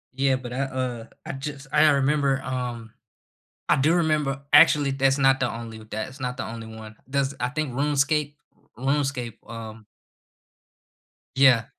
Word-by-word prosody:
Yeah, 135 0 +2
but 125 -2 -6
I, 130 - -3
uh 130 -3 -3 0.2
I - - -4
just 135 0 -7
I 155 +1 +5
remember, 140 -1 +2
um 120 -3 -4 0.8
I - - +6
do 150 +5 +3
remember 150 -5 +1
actually, 145 -1 +6
that's 135 0 +2
not 135 -1 +4
the 130 - +1
only 115 -1 -7
that 110 +3 -3
it's 130 +2 -14
not 125 0 -3
the 130 - -3
only 115 -1 -7
one, 110 -1 -10
there's, 135 0 0
I 125 - 0
think, 145 -1 -3
RuneScape 145 +2 +1 0.4
RuneScape, 135 -3 -1
um 110 -1 -9 1.5
Yeah. 130 -3 +5
135 Hz, 155 wpm, -25 LUFS, 120-140 Hz, 1.5 s, I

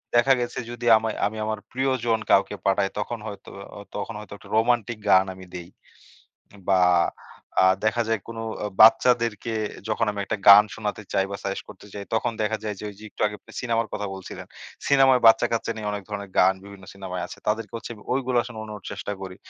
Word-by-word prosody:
দেখা 135 +3 +5
গেছে 120 - -3
যদি 120 0 -7
আমায় 110 0 -3
আমি 110 +2 -3
আমার 110 -1 -2
প্রিয়জন 130 -4 0
কাউকে - - +3
পাঠাই, 95 0 +2
তখন 115 +2 -4
হয়তো 100 -2 -9 0.3
অ - - -8 0.2
তখন 115 - -4
হয়তো 105 -1 -10
একটা - - -16
রোমান্টিক 120 0 +1
গান 95 0 +6
আমি 95 0 -12
দেই। 90 0 -7 1.0
বা, 95 -1 +4 0.8
আ - - +5 0.2
দেখা 115 +2 +2
যায় 115 -1 +1
কোনো 115 0 -6 0.2
অ - - 0
বাচ্চাদেরকে 115 0 +5 0.4
যখন 110 +1 0
আমি 100 -1 -5
একটা 110 - -2
গান 100 +1 +11
শোনাতে 105 0 -4
চাই 95 -1 +2
বা, 100 - -3
সাজেস্ট 100 0 -4
করতে - - -13
চাই, 100 -1 -6
তখন 115 +1 0
দেখা 110 +1 0
যায় 105 -1 -2
যে - - -7
ঐযে 105 +2 -14
একটু - - -16
আগে 105 - -5
আপনি - - -17
সিনেমার 115 -2 0
কথা 105 -1 -3
বলছিলেন, 95 -1 -9 0.4
সিনেমায় 135 -2 +5
বাচ্চা-কাচ্চা 115 0 +4
নিয়ে 105 -1 -4
অনেক 100 -1 -4
ধরনের 100 -2 -6
গান 95 +1 +5
বিভিন্ন 100 -2 -12
সিনেমায় 90 -2 -5
আছে, - - -11
তাদেরকে 110 +1 -1
হচ্ছে 115 - -7 0.2
ঐগুলা 130 -2 +1
শুনানোর 110 -3 -8
চেষ্টা 105 - -5
করি। 95 -1 -7
110 Hz, 190 wpm, -24 LUFS, 100-115 Hz, 1.0 s, গান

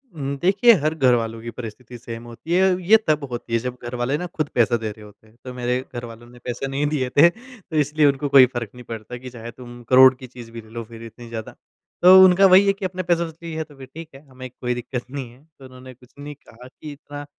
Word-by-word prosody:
हुँ, 140 -1 -4
देखिए 200 +6 +5
हर 155 +1 0
घरवालों 115 -5 +1
की 120 - -7
परिस्थिति 120 +2 -9
सेम 115 -1 -9
होती 120 +8 -7
है, 180 - +3 0.2
ये 180 - -8
ये 220 - +9
तब 150 -2 +1
होती 120 -1 -6
है 115 - +3
जब 125 +1 -6
घर 120 +1 -6
वाले 125 +4 -1
ना 180 - -5
खुद 155 -2 -2
पैसा 120 0 +3
दे 110 -1 -5
रहे 105 0 -14
होते 105 +1 -19
हैं। 110 - -24
तो 125 - -7
मेरे 125 0 -1 0.2
घरवालों 120 -1 -8
ने 120 0 -16
पैसे 125 +2 -4
नहीं 140 +2 -2
दिए 135 -4 -2
थे। 170 +4 +8
तो 240 -6 -13
इसलिए 150 +1 +2
उनको 140 +1 0
कोई 135 -2 +8
फ़र्क 120 -4 -4
नहीं 125 - -11
पड़ता 115 +1 -8
कि 125 +1 -10
चाहे 120 -1 -9
तुम 120 0 -12
करोड़ 130 0 +8
की 130 0 -12
चीज़ 120 -2 -12
भी 115 0 -8
ले 110 - -19
लो, 115 0 -6
फ़िर 115 +1 -12
इतनी 115 +1 -12
ज़्यादा। 110 -2 -7 0.5
तो 185 +1 +9
उनका 185 +1 +6
वही 190 +2 +7
है 195 - +4
कि 195 -1 -6
अपने 185 0 -4
पैसों 170 -1 0
से 165 +1 -15
ली 165 - -6
है 160 - -2
तो 150 -2 -18
फ़िर 135 -1 -12
ठीक 165 0 -9
है, 135 - -13
हमें 130 0 -10
कोई 125 0 -4
दिक्कत 125 0 -5
नहीं 135 -4 -6
है। 130 +4 -21 0.2
तो 135 - -13
उन्होंने 130 0 -13
कुछ 125 0 -22
नहीं 145 0 -8
कहा 125 -2 -16
कि 150 +3 -11
इतना 145 0 -10
130 Hz, 265 wpm, -22 LUFS, 120-150 Hz, 0.5 s, ये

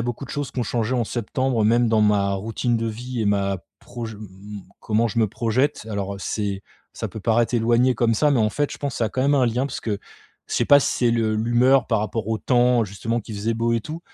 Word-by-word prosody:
a - - 0
beaucoup 120 +2 -4
de - - -10
choses 145 -3 -3
qui - - -7
ont - - +1
changé 115 +2 -1
en 120 -2 +1
septembre 120 +1 -1
même 120 +3 +3
dans 110 -1 +3
ma 105 -2 +3
routine 115 +4 -1
de 115 - -2
vie 120 +2 -5
et 110 - 0
ma 100 -1 +1 0.2
proj 115 -2 -7
mmh, 105 - -13
mmh, 100 0 -10 0.2
comment 110 +2 +1
je 115 - -3
me 110 - +4
projette. 115 +5 -1
Alors, 100 -1 -3
heu, 100 - -9
c'est 100 0 -3 0.3
ça - - -4
peut 110 - -8
paraître 115 +3 +1
éloigné 120 +2 +3
comme 115 0 +2
ça 150 +6 +3
mais 130 -5 +3
en 110 - +3
fait, 145 +6 -2
je - - -8
pense 140 -4 -3
ça 115 - 0
a 110 - 0
quand 130 - -2
même 140 +2 +3
un 130 - +3
lien 125 +4 0
parce 140 - -6
que 105 -3 -2 0.5
je - - -5
sais - - +2
pas 145 0 +7
si - - 0
c'est 120 -2 +2
le 115 -2 +1
l'humeur 120 +3 +3
par 110 - +1
rapport 105 +1 -3
au 110 -1 0
temps 125 -1 +3
justement 110 +4 -3
qui 110 0 -9
faisait 110 +3 -1
beau 115 +1 0
et 115 - 0
tout 155 +7 -7
115 Hz, 265 wpm, -23 LUFS, 105-125 Hz, 0.5 s, pas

